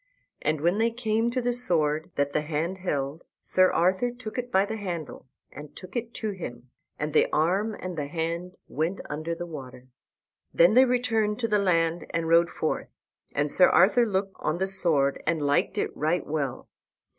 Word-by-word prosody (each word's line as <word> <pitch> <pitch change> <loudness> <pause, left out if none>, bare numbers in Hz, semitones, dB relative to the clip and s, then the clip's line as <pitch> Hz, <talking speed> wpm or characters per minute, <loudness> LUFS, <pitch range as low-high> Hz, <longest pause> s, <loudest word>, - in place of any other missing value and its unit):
And 150 0 0
when 175 +6 +2
they 230 +1 +3
came 230 -1 0
to 250 +1 -2
the 245 0 +1
sword 160 -9 +1
that 140 0 0
the 150 - +1
hand 165 +5 -3
held 145 -3 -3 0.2
Sir 185 0 +3
Arthur 185 +7 +2
took 240 -1 -7
it 245 0 -5
by 190 +1 +4
the 220 +2 -4
handle 175 -9 -6 0.2
and 150 0 -11
took 185 +4 -12
it 235 -1 -3
to 215 -2 -2
him, 125 -10 -8 0.3
and 150 0 -3
the - - +4
arm 195 +8 +1
and 185 -2 -6
the 145 -3 -3
hand 170 +3 -3
went 165 +5 -2
under 155 +3 -3
the 175 - -5
water. 130 -6 -10 0.6
Then 170 +5 +5
they 255 +3 +7
returned 230 -4 +1
unto 230 +2 -2
the 210 -1 +2
land 170 -3 +1
and 165 -1 -2
rode 170 +1 +5
forth. - - -2 0.5
And - - 0
Sir - - +6
Arthur 240 -1 +5
looked 195 -1 -2
on 155 - -1
the 190 - 0
sword 165 -8 +1
and 165 -1 +1
liked 145 0 +1
it - - -2
right 160 +4 0
well. 145 -4 -3
175 Hz, 190 wpm, -26 LUFS, 155-210 Hz, 0.6 s, they